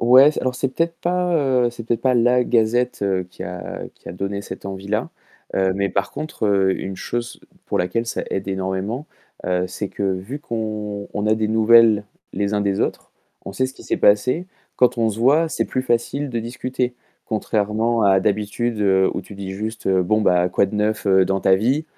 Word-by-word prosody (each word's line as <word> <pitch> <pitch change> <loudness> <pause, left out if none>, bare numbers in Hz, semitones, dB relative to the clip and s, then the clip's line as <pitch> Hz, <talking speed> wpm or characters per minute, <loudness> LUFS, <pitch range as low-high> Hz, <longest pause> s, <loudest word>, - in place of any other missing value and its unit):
ouais, 130 +5 +7
c'est - - -3
alors 130 0 -1
c'est 135 - 0
peut-être 165 0 0
pas, 180 0 0
heu, 130 -4 +2
c'est 115 -1 -9
peut-être 115 -1 -1
pas 130 0 +2
la 125 +1 +4
gazette 120 -1 +1 0.3
qui - - -9
a 90 -2 -6
qui - - -14
a - - -5
donné 100 +2 -4
cette 100 - -8
envie-là, 100 +3 -3 0.5
heu, 95 -1 +2
mais 100 +1 0
par 100 - -1
contre, 100 -10 0
une 95 -1 -5
chose 120 +5 -4 0.3
pour - - -1
laquelle 115 +6 0
ça 115 - -3
aide 95 0 -3
énormément, 95 +8 -3 0.4
heu, 90 0 +1
c'est 95 +2 -4
que - - -6
vu 95 +9 -2
qu'on 105 -4 -4
on 105 +1 -1
a 110 - +4
des 110 -1 0
nouvelles, 110 -1 +5 0.3
les 100 +2 -1
uns 105 - +1
des 100 -1 0
autres, - - -3 0.3
on 100 - -6
sait 130 +5 0
ce 130 - -9
qui - - -14
s'est - - -1
passé, 125 - +3 0.3
quand 125 -1 +3
on 115 -1 +3
se 110 +1 -4
voit, 150 +6 +4
c'est - - -1
plus 130 - -2
facile 130 +4 -1
de 120 -3 -2
discuter, 125 +1 -3 0.3
contrairement 110 +2 0
à 95 -1 +5
d'habitude 105 +3 -1 0.3
où - - -2
tu 100 - -12
dis 95 -1 -5
juste: 110 +2 -4
«Bon 95 +3 +2
ben, 90 -3 +3
quoi 100 - +2
de 95 - -8
neuf, 105 0 0
heu, 95 -1 +5
dans 95 +1 0
ta 95 - +5
vie?» 130 +10 +1
110 Hz, 200 wpm, -21 LUFS, 100-125 Hz, 0.5 s, ouais